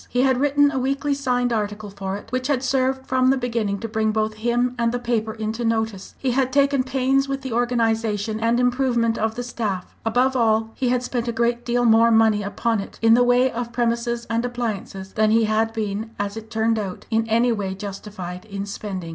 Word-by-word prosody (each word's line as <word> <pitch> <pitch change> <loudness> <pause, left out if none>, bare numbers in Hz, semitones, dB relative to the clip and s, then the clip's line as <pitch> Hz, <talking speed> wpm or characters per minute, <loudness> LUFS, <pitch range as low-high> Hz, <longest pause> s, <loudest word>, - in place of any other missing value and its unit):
He 250 +1 +1
had 260 -2 +3
written 290 +1 +3
a 270 - -1
weekly 275 +2 0
signed 245 -3 0
article 210 -1 -3
for 195 0 -4
it, 205 - -13
which 255 0 -1
had 275 -3 0
served 265 0 0
from 255 0 +2
the 270 - +3
beginning 230 -5 -1
to 230 - -3
bring 220 0 0
both 215 0 0
him 240 +3 0
and 230 0 +2
the 245 - -1
paper 235 -2 -1
into 220 +2 -3
notice; 220 -4 -2
he 260 - -1
had 260 +1 +1
taken 280 0 +3
pains 265 +1 +1
with 275 -1 -3
the 260 -3 -4
organisation 225 -3 0
and 230 +2 +2
improvement 245 -2 +1
of 220 0 -1
the 245 - -3
staff; 210 -6 -4
above 250 +4 +2
all, 225 -2 +2
he 255 -2 -1
had 250 0 +1
spent 245 -1 -2
a - - +1
great 235 +1 0
deal 240 0 +1
more 230 0 +6
money 220 -2 +4
upon 220 +2 -1
it, 195 - -7
in 225 0 +6
the 240 - +5
way 245 +1 +3
of 235 0 -4
premises 235 0 -1
and 230 0 0
appliances, 215 -6 -4
than 215 0 +2
he 225 +1 +4
had 220 +1 +1
been, 215 0 -3
as 205 0 -3
it 220 0 -8
turned 225 0 +1
out, 195 -3 -5
in 225 0 +1
any 235 +2 +3
way 195 -4 -2
justified 195 -2 -7
in 200 -2 -5
spending. 195 -4 -6
230 Hz, 215 wpm, -22 LUFS, 215-245 Hz, -, more